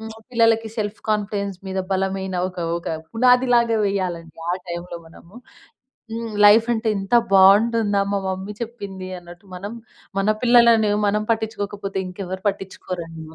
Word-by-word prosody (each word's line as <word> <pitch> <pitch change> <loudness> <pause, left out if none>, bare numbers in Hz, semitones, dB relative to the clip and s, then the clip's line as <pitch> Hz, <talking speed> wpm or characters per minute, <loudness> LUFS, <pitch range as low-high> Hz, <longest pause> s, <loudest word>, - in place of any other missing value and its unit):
హ్మ్, 220 0 -7 0.2
పిల్లలకి 230 -2 +2
self 210 0 -3
confidence 200 -2 -2
మీద 190 0 -3
బలమైన 190 0 -2
ఒక 180 - -12 0.2
ఒక 170 - -7 0.2
పునాదిలాగా 245 -1 +3
వెయ్యాలండి 175 -5 -3
ఆ - - +2 0.2
టైంలో 175 0 -6
మనము. 170 +3 -17 0.8
హ్మ్. 230 -1 -5
లైఫంటే 225 +2 +5
ఎంత 195 +4 -2 0.2
బావుంటుందా 205 +2 +5
మా 200 - +1
మమ్మీ 190 +2 -4
చెప్పింది 200 -5 -7
అన్నట్టు 175 +2 -14
మనం, 200 +4 -6 0.5
మన 195 - 0 0.2
పిల్లలని 235 -3 +5 0.2
మనం 210 +1 +1
పట్టిచ్చుకోకపోతే 205 -3 -3
ఇంకెవ్వరు 185 0 -6
పట్టించుకోరండి. 180 -4 -6
200 Hz, 125 wpm, -22 LUFS, 190-225 Hz, 0.8 s, లైఫంటే